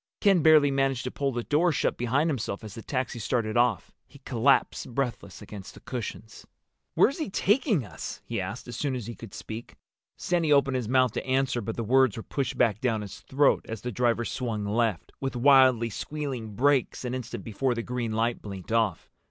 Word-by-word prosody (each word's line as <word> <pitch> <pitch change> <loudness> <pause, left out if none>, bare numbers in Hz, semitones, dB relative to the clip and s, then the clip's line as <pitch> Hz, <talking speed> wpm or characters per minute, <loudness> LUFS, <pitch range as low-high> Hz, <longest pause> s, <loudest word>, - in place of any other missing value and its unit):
Ken 195 -4 +4
barely 150 -2 +6
managed 135 -2 +1
to 125 - -4
pull 140 -1 -1
the 120 -1 -3
door 165 +7 +2
shut - - 0
behind 130 +6 +1
himself 115 -9 -3
as 105 -2 -8
the 115 - -8
taxi 130 -1 -3
started 110 -1 -1
off. 120 -5 +2 0.2
He - - -16
collapsed 125 -1 +1
breathless 120 -7 -3
against 100 -2 -10
the - - -12
cushions. 115 -3 -7 0.5
"Where's 275 +7 +3
he 310 - -2
taking 205 - +2
us?" - - -7
he - - -2
asked, - - -6
as 120 - -6
soon 135 +1 -1
as 120 -4 -5
he 120 - -6
could 115 -3 -11
speak. 110 +1 -8 0.4
Sandy 170 -4 0
opened 140 -2 +4
his 120 -4 -3
mouth 130 -2 +4
to - - -3
answer, 130 -1 +1
but 110 +1 -4
the 115 - -3
words 130 0 +3
were 115 - -5
pushed 135 -3 -3
back 110 -3 +2
down 115 -4 0
his 100 -2 -8
throat 140 +1 +2
as 110 -2 -5
the 125 - -4
driver 120 0 +1
swung 110 -5 -3
left, 110 -3 0
with 135 -1 -3
wildly 130 -3 +5
squealing 130 -5 -5
brakes, 135 0 +1
an 125 - -2
instant 125 -2 -5
before 120 +3 -1
the 115 - -3
green 120 -2 -3
light 115 +2 0
blinked 100 -1 -8
off. 110 -7 +1
125 Hz, 200 wpm, -27 LUFS, 115-135 Hz, 0.5 s, barely